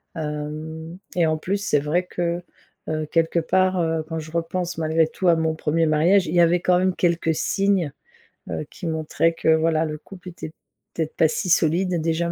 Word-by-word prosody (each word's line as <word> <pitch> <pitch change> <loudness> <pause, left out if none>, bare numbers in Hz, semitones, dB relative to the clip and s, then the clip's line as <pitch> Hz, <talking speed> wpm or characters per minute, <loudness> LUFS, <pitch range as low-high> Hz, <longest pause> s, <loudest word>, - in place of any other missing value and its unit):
Hem, 155 +2 -5 0.2
et 170 -2 +3
en 155 0 +1
plus, 190 +6 -1
c'est 200 -7 +1
vrai 150 +5 0
que, 175 0 -2 0.5
heu, 155 0 -1
quelque 165 +1 +1
part, 185 +2 +2
heu, 165 -1 0
quand 165 - -4
je 155 0 -9
repense 170 +1 -2
malgré 160 0 +2
tout 185 +3 -3
à 170 - +6
mon 160 0 0
1er 160 +1 +1
mariage, 175 +6 +4
il 155 - -3
y 175 - +6
avait 170 +1 +4
quand 180 -1 +3
même 185 0 +1
quelques 170 -2 +1
signes, 195 -2 +1 0.6
heu, - - -3
qui 180 - -9
montraient 160 +1 +1
que 160 - -1
voilà, 160 0 +1
le 155 0 -4
couple 180 +3 -13
était, 170 -2 -8 0.4
peut-être, 160 -2 -3
pas 160 - +4
si 180 +3 -2
solide 170 +1 +2
déjà, 165 +1 0
165 Hz, 195 wpm, -23 LUFS, 160-175 Hz, 0.6 s, à